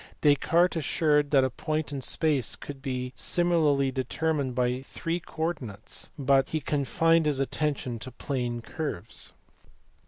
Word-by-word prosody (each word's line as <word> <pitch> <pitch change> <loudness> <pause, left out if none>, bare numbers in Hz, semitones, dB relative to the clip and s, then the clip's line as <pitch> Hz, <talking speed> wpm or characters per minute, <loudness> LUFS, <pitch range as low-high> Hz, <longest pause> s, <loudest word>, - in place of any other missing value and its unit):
Descartes 165 +5 +4
asserted 150 -1 +2
that 135 -2 +5
a 130 - +1
point 155 -1 -2
in 140 -2 -3
space 140 -2 0
could 140 -2 -9
be 125 -2 -3
similarly 155 -6 +2
determined 140 0 -1
by 125 0 +1
three 165 +5 -3
coordinates, 145 - -4
but 135 -1 +3
he 155 - 0
confined 155 +3 +2
his 145 -3 +1
attention 135 -4 -1
to 130 - -7
plane 120 -2 -3
curves. 155 - -5
140 Hz, 130 wpm, -28 LUFS, 130-155 Hz, -, that